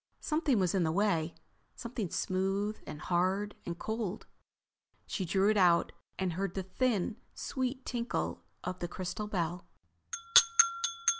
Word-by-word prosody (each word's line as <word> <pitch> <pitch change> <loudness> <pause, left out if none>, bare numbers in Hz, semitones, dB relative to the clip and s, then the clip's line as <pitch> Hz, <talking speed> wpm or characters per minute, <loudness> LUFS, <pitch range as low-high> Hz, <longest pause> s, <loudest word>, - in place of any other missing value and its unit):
Something 305 -5 +1
was 185 -3 +2
in 190 - +2
the 160 -2 +2
way—something 185 +4 -2
smooth 195 +4 -1
and 150 - -7
hard 190 +4 +1
and 170 -1 -3
cold. 220 -1 -3 0.8
She 190 - -3
drew 195 +4 +3
it 215 - +1
out 175 -3 +4 0.3
and 185 -2 -1
heard 190 +1 -2
the 190 - -2
thin, 215 +1 0 0.2
sweet 260 0 -3
tinkle 240 -1 -2 0.2
of 180 0 -4
the 175 - -2
crystal 185 +4 -4
bell. 180 -3 -2
190 Hz, 130 wpm, -32 LUFS, 175-215 Hz, 0.8 s, out